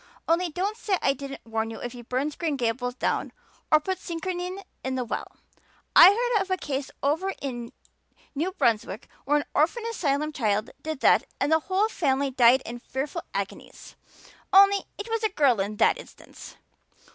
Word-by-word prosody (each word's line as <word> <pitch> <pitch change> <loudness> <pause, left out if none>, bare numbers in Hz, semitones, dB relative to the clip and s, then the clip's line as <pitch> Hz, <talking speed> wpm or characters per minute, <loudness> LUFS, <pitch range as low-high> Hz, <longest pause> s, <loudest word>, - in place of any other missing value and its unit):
"Only 340 +2 +2
don't 385 +7 -2
say 405 -5 0
I 275 - +2
didn't 275 -2 -8
warn 225 0 -2
you 225 - -7
if 245 - -5
he 245 0 -9
burns 260 +5 -2
Green 320 -4 -1
Gables 245 +1 -1
down - - -1 0.4
or 310 - +7
puts 375 +4 -3
strychnine 360 +2 -4 0.2
in 260 0 -2
the 250 -1 -2
well 230 - -4 0.7
I 340 - +11
heard 465 +1 +2
of 390 - -4
a 375 - +1
case 275 -4 -4
over 325 +8 +1
in 240 -4 -5 0.6
New 320 +6 -1
Brunswick 225 - 0 0.2
where 295 +2 +3
an 290 - -2
orphan 345 +10 +2
asylum 305 -6 -1
child 215 -4 0
did 315 -3 -5
that - - +5
and 285 - 0
the 320 - +5
whole 380 +6 +1
family 280 -9 0
died 250 +1 +5
in 240 +1 -6
fearful 265 +4 -4
agonies. - - -6 0.6
Only, 395 +1 +6
it 410 - -6
was 455 0 -2
a 435 - +3
girl 280 - +3
in 200 +2 -2
that - - +3
instance." - - -13
295 Hz, 180 wpm, -26 LUFS, 250-370 Hz, 0.7 s, I